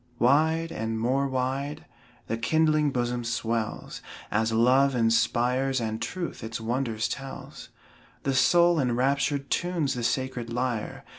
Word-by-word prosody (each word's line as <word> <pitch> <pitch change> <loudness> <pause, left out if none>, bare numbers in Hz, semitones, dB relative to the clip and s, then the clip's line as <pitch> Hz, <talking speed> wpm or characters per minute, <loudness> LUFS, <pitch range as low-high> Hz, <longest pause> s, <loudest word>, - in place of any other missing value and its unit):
Wide, 160 +6 +3
and 110 -7 -3
more 130 +4 +1
wide, 135 +2 -2 0.4
the 115 - -2
kindling 155 +4 +2
bosom 120 -2 -1
swells, 115 -1 -3 0.3
As 110 +2 +1
love 130 +4 +4
inspires, 125 +3 +2
and 110 -1 -3
truth 175 -9 -4
its 110 0 -4
wonders 115 -1 -1
tells. 135 -1 -7 0.5
The 135 - 0
soul 170 +5 +4
enraptured 140 +2 0
tunes 170 -6 0
the 125 - -4
sacred 120 0 -2
lyre. 120 -2 -3
130 Hz, 125 wpm, -27 LUFS, 115-140 Hz, 0.5 s, love